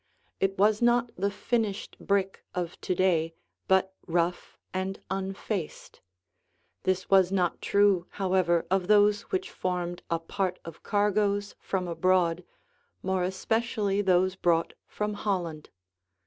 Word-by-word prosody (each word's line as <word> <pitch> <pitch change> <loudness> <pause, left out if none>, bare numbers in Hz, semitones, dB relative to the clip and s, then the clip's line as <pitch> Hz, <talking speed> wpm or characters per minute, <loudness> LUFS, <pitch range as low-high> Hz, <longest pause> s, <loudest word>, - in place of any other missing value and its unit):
It 195 0 0
was 210 +3 +3
not 240 0 +3
the 200 +2 0
finished 205 -1 -2
brick 195 -1 0
of 175 -1 -4
to 185 - -1
day 165 -3 +2 0.3
but 190 0 +3
rough 175 +1 -1 0.2
and 190 +1 -2
unfaced. 195 -2 -4 0.8
This 185 0 0
was 190 -2 +5
not 180 -3 0
true, 200 -3 +3
however, 185 -3 +2
of 190 -2 +1
those 205 0 +5
which 380 -1 -2
formed 175 -1 -3
a 170 - +1
part 185 +2 -2
of 165 -1 -9
cargoes 205 0 +1
from 185 -2 -2
abroad, 180 0 +2 0.6
more 190 0 0
especially 205 +2 0
those 185 -1 +3
brought 170 -3 +1
from 210 0 -3
Holland. 175 -7 -3
190 Hz, 125 wpm, -28 LUFS, 180-205 Hz, 0.8 s, was